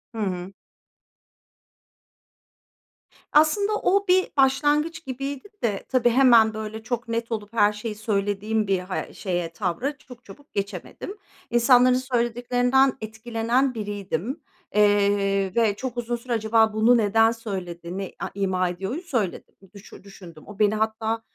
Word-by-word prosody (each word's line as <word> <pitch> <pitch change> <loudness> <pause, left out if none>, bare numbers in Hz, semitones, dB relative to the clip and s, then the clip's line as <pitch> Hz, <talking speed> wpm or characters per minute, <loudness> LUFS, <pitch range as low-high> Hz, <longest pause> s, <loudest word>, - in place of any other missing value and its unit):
Hı - - -7
hı. 185 -1 -3 2.8
Aslında 400 +8 +4
o 400 -1 +1
bir 370 +1 +3
başlangıç 295 +4 +2
gibiydi 275 +5 -5 0.2
de, 205 -4 -1
tabii 250 -2 +3
hemen, 235 -3 +5
böyle, 220 0 -6
çok 235 0 -3
net 230 0 -3
olup 215 0 -4
her 210 -2 +4
şeyi 210 +1 -5
söylediğim 210 0 -1
bir 190 -2 +1
ha 185 +1 -5
şeye, 175 -3 -3
tavra 220 - -2
çok 250 -4 -15
çabuk 285 +9 -15
geçemedim. 200 - -5 0.3
İnsanların 245 +1 +5 0.2
söylediklerinden 245 +3 +2
etkilenen 230 +4 -1
biriydim. 205 - -4 0.3
Eee, 200 -2 +3
ve 225 -3 +3
çok 250 +2 -5
uzun 240 0 -2
süre 235 +1 -5
"Acaba 220 0 +2
bunu 225 +3 +4
neden 225 +1 +3
söyledi, 185 -6 -6
ne 195 -1 -5
a - - -4
ima 185 -2 0
ediyoru?" 195 - -4
söyledim 235 - -3 0.2
düşü 200 -1 -13
düşündüm. 180 -5 -13
O 205 0 -11
beni 210 0 +3
hatta 220 +1 -1
220 Hz, 130 wpm, -24 LUFS, 200-250 Hz, 2.8 s, hemen